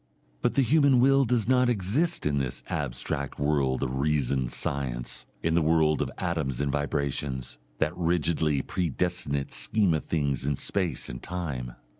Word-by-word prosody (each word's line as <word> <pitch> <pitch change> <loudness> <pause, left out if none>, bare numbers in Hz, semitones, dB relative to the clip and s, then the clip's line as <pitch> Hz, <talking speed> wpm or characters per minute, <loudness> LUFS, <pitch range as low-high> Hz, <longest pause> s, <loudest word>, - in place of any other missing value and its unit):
But - - +1
the 140 - +4
human 140 0 +4
will 135 +2 +5
does 115 -3 +1
not 125 -1 +4
exist 120 - +1
in 70 -1 +1
the 65 -3 -3
abstract 70 +1 -3
world 70 -3 +1
of 65 0 -2
reasoned 70 -3 +1
science, 60 -4 -3 0.2
in 80 - +1
the 85 - +3
world 80 -1 +3
of - - -1
atoms 80 -8 -2
and 70 0 0
vibrations, 70 -3 -2 0.2
that 75 +7 0
rigidly 80 -4 +1
predestinate 85 -4 -1
scheme 105 -6 +2
of 80 - -2
things 70 -5 0
in 70 +1 0
space 95 +4 -1
and - - -7
time. 70 -9 -4
75 Hz, 155 wpm, -27 LUFS, 70-90 Hz, 0.2 s, will